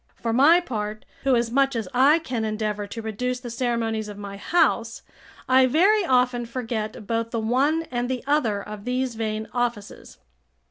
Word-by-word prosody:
For 230 -1 -3
my 295 +8 +6
part, 215 -9 -5 0.2
who 265 -2 +4
as 235 -1 0
much 275 +1 +2
as 225 -4 -2
I 275 +5 +5
can 255 -9 -3
endeavour 215 -1 -2
to 225 +2 -7
reduce 250 +4 -3
the 245 -2 -8
ceremonies 230 -3 -1
of 205 -1 -8
my 200 -1 -7
house, 230 - +1 0.4
I 260 0 +5
very 385 - +4
often 250 -3 +2
forget 225 -3 -4
both 230 +1 -1
the 230 - -2
one 270 +9 +1
and 245 0 -2
the 255 -2 -3
other 235 -9 +1
of 210 -1 -9
these 250 0 -1
vain 220 -1 -3
offices. 240 -4 -4
240 Hz, 175 wpm, -24 LUFS, 220-260 Hz, 0.4 s, my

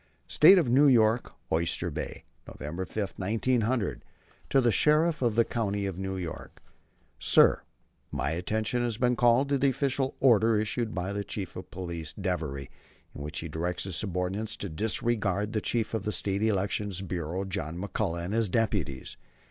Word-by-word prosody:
STATE 195 - +7
OF 165 -7 +3
NEW 135 +5 +5
YORK 115 -2 +3 0.2
OYSTER 85 +1 0
BAY, - - -6 0.2
November 85 +6 -5
5, 100 +1 -4
1900. 115 +2 0 0.5
To 135 - +4
the 120 -3 +3
Sheriff 155 +5 +3
of 120 -4 +1
the 115 0 +4
County 100 -3 -2
of 95 -2 -4
New 95 0 -3
York. 85 -3 -7 0.6
Sir: - - +5 0.5
My - - -1
attention 110 +8 -1
has 120 -3 -1
been 125 0 +2
called 120 +3 +4
to 140 -1 +1
the 140 +1 +4
official 135 0 -1
order 115 -4 +4
issued 110 +1 -2
by 95 +3 -2
Chief 100 -3 -6
of 90 - -8
Police 85 -4 -6
Devery 80 -8 -3 0.4
in - - -8
which 75 +1 -4
he 80 - -5
directs 85 +3 -2
his 95 -3 -4
subordinates 95 +3 -2
to 100 - -5
disregard 105 +2 0
the 110 - 0
Chief 115 0 -1
of 110 - -1
the 105 - -2
State 100 -1 -1
Election 105 -1 0 0.2
Bureau, 90 +1 -3
John 90 -4 -4
McCullagh, 85 -3 -2
and 95 - -4
his 115 -2 +1
deputies. 90 - -1
105 Hz, 165 wpm, -28 LUFS, 90-115 Hz, 0.6 s, STATE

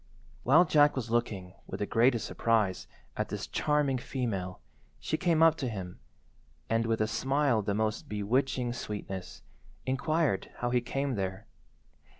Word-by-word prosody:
While 155 +8 +6
Jack 145 -2 +5
was 120 -4 -3
looking, 100 -6 -1
with - - -6
the 105 - 0
greatest 115 +2 +3
surprise, 110 -5 +1 0.3
at - - -2
this - - -4
charming 150 -3 +1
female, 100 -9 -3 0.4
she - - -1
came 165 -2 +3
up 165 -1 +7
to 130 - -2
him, 95 -5 -6 0.7
and, 115 0 +2
with 115 -1 +1
a 110 - +2
smile 135 +1 +1
of 105 - -4
the 100 - +1
most 110 0 -1
bewitching 120 +4 0
sweetness, 100 -5 -6 0.4
inquired 140 - 0
how 120 0 -2
he 125 0 +3
came 135 +3 -2
there. 95 -3 -3
120 Hz, 155 wpm, -30 LUFS, 105-135 Hz, 0.7 s, up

